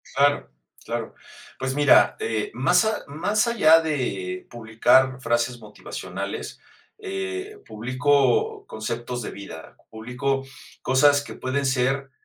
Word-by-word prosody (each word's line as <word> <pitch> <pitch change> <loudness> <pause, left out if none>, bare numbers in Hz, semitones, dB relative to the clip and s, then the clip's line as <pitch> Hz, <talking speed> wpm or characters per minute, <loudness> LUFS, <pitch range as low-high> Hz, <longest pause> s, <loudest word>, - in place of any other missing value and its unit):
Claro, 145 +1 +2 0.3
claro. - - -4 0.4
Pues 130 0 -2
mira, 145 -1 +5
eh, 110 -2 -2
más 175 - +3
a 220 -1 -1
más 205 - 0
allá 165 -9 +5
de 100 - -3
publicar 120 +3 +2
frases 120 0 0
motivacionales, 105 -2 -7 0.4
eh, 390 0 -5
publico 130 +3 +1
conceptos 120 +3 -5
de - - -5
vida, 100 -5 -10
publico 125 +4 -3 0.4
cosas 145 +2 +4
que - - -9
pueden 140 +2 -2
ser, 135 +1 0
130 Hz, 115 wpm, -24 LUFS, 120-145 Hz, 0.4 s, mira